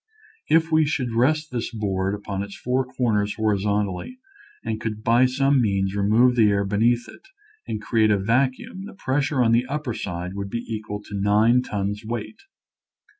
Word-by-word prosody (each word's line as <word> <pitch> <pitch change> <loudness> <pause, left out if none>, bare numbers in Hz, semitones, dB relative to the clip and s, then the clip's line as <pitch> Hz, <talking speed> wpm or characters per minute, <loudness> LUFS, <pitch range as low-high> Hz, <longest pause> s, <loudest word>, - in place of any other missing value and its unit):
If 165 +1 +3
we 155 -1 +4
should 130 -6 -2
rest 155 +7 +1
this 120 -2 -3
board 100 -3 -1
upon 100 -1 -5
its 100 0 -7
four 130 +1 0
corners 115 -5 0
horizontally 105 - -1 0.5
and 110 0 -3
could 110 -1 -4
by 120 +3 +4
some 135 +1 +2
means 100 -3 0
remove 110 +5 +3
the 110 -3 +5
air 100 0 +1
beneath 115 +4 +1
it - - -15 0.4
and 110 - -3
create 110 0 +2
a 105 - +3
vacuum 130 - -1
the 210 - -11
pressure 145 -4 0
on 115 - +3
the 120 +2 +2
upper 145 -3 -3
side 90 -4 -5
would 100 0 -5
be 115 +3 -4
equal 105 -2 -5
to 105 - -12
nine 110 +5 +4
tons 105 -2 -3
weight. 115 - -5
115 Hz, 175 wpm, -23 LUFS, 105-130 Hz, 0.5 s, the